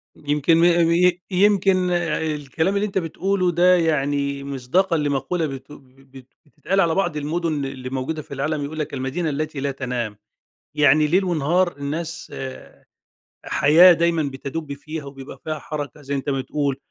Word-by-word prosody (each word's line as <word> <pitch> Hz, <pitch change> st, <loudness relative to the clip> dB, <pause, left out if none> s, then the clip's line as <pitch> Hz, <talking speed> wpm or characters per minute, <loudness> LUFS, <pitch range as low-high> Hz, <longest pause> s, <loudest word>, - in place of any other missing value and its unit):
يمكن 150 Hz, +2 st, +1 dB
م 165 Hz, -, +4 dB, 0.3 s
ي 180 Hz, +1 st, +3 dB
يمكن 190 Hz, -1 st, +3 dB
آآ 175 Hz, -4 st, 0 dB
الكلام 160 Hz, +7 st, -1 dB
اللي 200 Hz, +1 st, +1 dB
أنتَ 195 Hz, -, -4 dB
بتقوله 185 Hz, +2 st, 0 dB
ده 180 Hz, +2 st, +5 dB
يعني 140 Hz, -4 st, 0 dB
مصداقًا 140 Hz, +7 st, 0 dB
لمقولة 145 Hz, +3 st, -1 dB
بت 135 Hz, 0 st, -7 dB
بت 135 Hz, -1 st, -16 dB, 0.2 s
بتتقال 155 Hz, +7 st, -2 dB
على 165 Hz, -2 st, +2 dB
بعض 195 Hz, -6 st, 0 dB
المدن 155 Hz, -1 st, -2 dB
اللي 130 Hz, -1 st, -6 dB
موجودة 135 Hz, +4 st, -3 dB
في 140 Hz, -, -11 dB
العالم 145 Hz, +2 st, -2 dB
يقول 155 Hz, +2 st, -6 dB
لَك: 150 Hz, -, -3 dB
"المدينة 140 Hz, +5 st, -2 dB
التي 150 Hz, 0 st, -3 dB
لا 140 Hz, 0 st, -1 dB
تنام." 125 Hz, -6 st, -4 dB, 0.6 s
يعني 150 Hz, +1 st, +4 dB
ليل 185 Hz, +5 st, +3 dB
ونهار 175 Hz, 0 st, +1 dB
الناس 160 Hz, +4 st, -5 dB
آآ 130 Hz, -1 st, -9 dB, 0.6 s
حياة 170 Hz, +6 st, +6 dB
دايمًا 170 Hz, -1 st, +1 dB
بتدب 140 Hz, +2 st, -5 dB
فيها 155 Hz, +2 st, -7 dB
وبيبقى 135 Hz, -1 st, -10 dB
فيها 155 Hz, -1 st, -3 dB
حركة 145 Hz, -1 st, -6 dB
زي 140 Hz, +1 st, -4 dB
أنتَ 140 Hz, +1 st, -4 dB
ما 135 Hz, -1 st, 0 dB
بتقول، 140 Hz, 0 st, -2 dB
150 Hz, 160 wpm, -22 LUFS, 140-170 Hz, 0.6 s, حياة